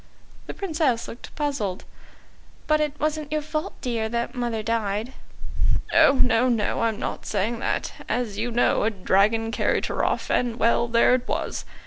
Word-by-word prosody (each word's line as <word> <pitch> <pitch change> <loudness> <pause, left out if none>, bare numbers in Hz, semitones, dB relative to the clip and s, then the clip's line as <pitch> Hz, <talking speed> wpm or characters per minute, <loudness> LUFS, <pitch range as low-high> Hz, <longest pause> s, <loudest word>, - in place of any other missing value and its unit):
The - - -6
Princess 310 - 0
looked 235 - -10
puzzled. 265 -11 -2 0.8
"But 305 0 +2
it 300 -1 -2
wasn't 305 -1 -1
your 305 -1 0
fault, 305 +1 -4
dear, 230 -3 -1
that 235 +1 -2
mother 240 -3 -2
died." 225 +1 -1 0.8
"Oh, 275 - +7
no, 250 -2 +3
no, 225 -4 0
I'm 225 -2 +1
not - - -5
saying 215 +3 -1
that. - - -2 0.2
As 240 -5 -1
you 225 +4 -2
know, 240 -2 +2
a 215 - +3
dragon 215 +3 +2
carried - - +1
her - - -2
off - - -1
and 240 -2 +1
well, 235 0 +3
there 235 +1 +4
it 250 -1 0
was. - - -3
235 Hz, 165 wpm, -24 LUFS, 225-275 Hz, 0.8 s, Oh